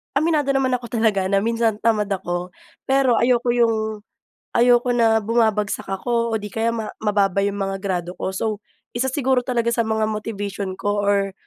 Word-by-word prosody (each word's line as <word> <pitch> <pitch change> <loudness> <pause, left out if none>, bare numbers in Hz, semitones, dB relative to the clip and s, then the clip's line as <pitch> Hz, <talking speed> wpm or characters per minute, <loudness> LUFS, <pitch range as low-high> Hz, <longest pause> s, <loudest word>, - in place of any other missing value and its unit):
aminado 310 -3 +2
naman 265 -1 +1
ako 245 -1 -2
talaga 220 -5 +1
na 195 +1 +1
minsan 230 -1 +1
tamad 215 -3 +2
ako. 180 -2 -3 0.4
Pero, 265 -2 +3
ayoko 240 0 +2
yung, 220 -3 +1 0.5
ayoko 245 +1 +4
na 225 -2 +4
bumabagsak 220 -3 0
ako 235 +4 -1
o - - +2
'di 210 -1 -7
kaya 225 +1 0
ma 225 -2 -3 0.2
mababa 200 -2 +1
'yong 200 0 -2
mga 195 -1 -2
grado 180 -3 -2
ko. - - -2
So, 190 - -2 0.5
isa 255 +2 0
siguro 260 -1 +1
talaga 235 -2 0
sa 235 - +1
mga 220 0 0
motivation 205 -3 -4
ko 205 0 -1
or, 200 -1 +1
220 Hz, 175 wpm, -21 LUFS, 200-240 Hz, 0.5 s, ayoko